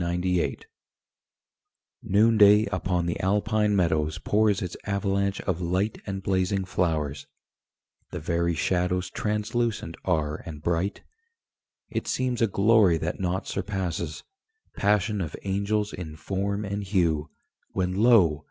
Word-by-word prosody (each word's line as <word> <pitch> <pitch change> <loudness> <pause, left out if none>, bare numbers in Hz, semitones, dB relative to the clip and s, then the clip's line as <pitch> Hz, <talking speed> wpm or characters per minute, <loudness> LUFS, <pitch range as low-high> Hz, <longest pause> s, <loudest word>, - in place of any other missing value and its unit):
INSPIRATION 90 0 0 1.4
Noonday 105 0 +5
upon 90 -2 -1
the 85 - -2
Alpine 105 +2 +1
meadows 80 -4 +1
Pours 105 -2 +1
its 90 - -5
avalanche 100 -1 0
of 90 -2 -2
Light 95 +5 -1
And 95 -1 -4
blazing 95 0 0
flowers: 80 -6 -1 0.8
the - - -5
very 85 +1 0
shadows 90 +3 0
Translucent 105 -3 -2
are 75 -4 0
and 75 -4 -9
bright. 85 +4 -1 0.9
It - - -3
seems 125 -2 -1
a 115 - +4
glory 100 -3 +4
that 80 +2 -3
nought 95 +1 -2
surpasses 85 -5 -3 0.5
Passion 105 0 +1
of 80 -3 -4
angels 100 +2 -1
in 80 -4 -7
form 100 +6 -2
and 100 +1 -3
hue 85 -6 0 0.4
When, 90 -1 0
lo! 100 -8 +4
95 Hz, 120 wpm, -26 LUFS, 85-105 Hz, 1.4 s, Noonday